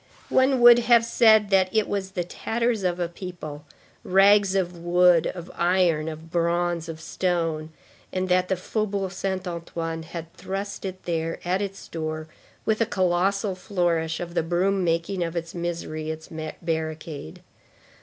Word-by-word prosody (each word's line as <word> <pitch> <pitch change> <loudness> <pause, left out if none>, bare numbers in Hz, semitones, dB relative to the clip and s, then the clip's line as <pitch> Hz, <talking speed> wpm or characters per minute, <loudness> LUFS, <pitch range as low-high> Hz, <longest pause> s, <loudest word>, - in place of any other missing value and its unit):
One 260 -1 +3
would 240 0 +9
have 235 -1 +5
said 220 -3 +5
that 190 -1 +4
it 215 -2 +2
was 190 -1 -3
the 180 - -1
tatters 225 +4 -1
of 180 -1 0
a 175 - 0
people, 170 -4 -8 0.4
rags 195 +1 +5
of 180 -2 0
wood, 175 0 +4
of 175 -1 -6
iron, 170 -3 +2
of 160 +1 -9
bronze, 170 0 0
of 160 -1 -6
stone, 165 -2 -1 0.4
and 185 0 -1
that 180 0 +2
the 190 - +1
Faubourg 195 0 -2
Saint 190 0 -3
Antoine 165 -1 -4
had 165 0 -8
thrust 195 +1 -5
it 185 -1 -6
there 165 -1 -2
at 185 +2 +1
its 195 -1 -5
door, 155 -1 -4 0.4
with 220 +1 +1
a 230 - +3
colossal 190 +2 +1
flourish 175 -4 -1
of 175 -1 -5
the - - +2
broom 185 +4 +1
making 170 +2 0
of 165 0 -4
its 165 0 -4
misery 170 -2 -4
its 160 0 -6 0.3
barricade. 160 - -4
175 Hz, 155 wpm, -25 LUFS, 165-195 Hz, 0.4 s, would